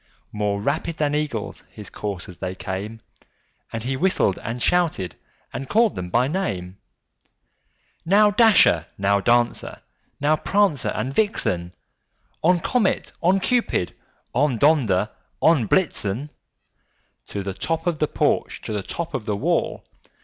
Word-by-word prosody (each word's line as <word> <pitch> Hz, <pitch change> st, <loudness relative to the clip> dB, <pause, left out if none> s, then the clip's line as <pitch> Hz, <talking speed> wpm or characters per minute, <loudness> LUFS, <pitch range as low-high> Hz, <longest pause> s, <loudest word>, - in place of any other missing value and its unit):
More 105 Hz, -1 st, -1 dB
rapid 160 Hz, +9 st, -2 dB
than 145 Hz, -1 st, 0 dB
eagles 145 Hz, -8 st, -3 dB
his 105 Hz, -2 st, -10 dB
coursers 95 Hz, -3 st, -6 dB
they 95 Hz, 0 st, -4 dB
came, 100 Hz, +4 st, -5 dB, 0.7 s
And 115 Hz, -1 st, -4 dB
he 130 Hz, +2 st, -1 dB
whistled, 145 Hz, -, +1 dB
and 115 Hz, +2 st, -5 dB
shouted, 160 Hz, -, +1 dB, 0.4 s
and 135 Hz, 0 st, -5 dB
called 225 Hz, 0 st, +3 dB
them 90 Hz, 0 st, -5 dB
by 120 Hz, +7 st, +2 dB
name: 100 Hz, -, -3 dB, 1.2 s
"Now, 205 Hz, +5 st, +5 dB
Dasher! 220 Hz, 0 st, +5 dB
now, 100 Hz, +1 st, +2 dB
Dancer! 120 Hz, +3 st, +1 dB, 0.4 s
now, 150 Hz, +2 st, +3 dB
Prancer 195 Hz, -9 st, +1 dB
and 120 Hz, +5 st, -2 dB
Vixen! 90 Hz, -, 0 dB, 0.7 s
On, 175 Hz, +2 st, +4 dB
Comet! 220 Hz, +3 st, 0 dB
on, 185 Hz, +3 st, +3 dB
Cupid! 235 Hz, -, 0 dB, 0.4 s
on, 135 Hz, -1 st, +2 dB
Donder 110 Hz, -8 st, +3 dB, 0.3 s
and 150 Hz, -10 st, +3 dB
Blitzen! 145 Hz, -, 0 dB, 1.0 s
To 100 Hz, -, -4 dB
the 95 Hz, 0 st, -4 dB
top 160 Hz, -, -2 dB
of 170 Hz, -3 st, 0 dB
the 150 Hz, -, +2 dB
porch! -, -, 0 dB
to -, -, -4 dB
the 105 Hz, -, -1 dB
top 170 Hz, -, -5 dB
of 110 Hz, -, -3 dB
the 105 Hz, -, 0 dB
wall! -, -, -1 dB
125 Hz, 135 wpm, -23 LUFS, 100-170 Hz, 1.2 s, Now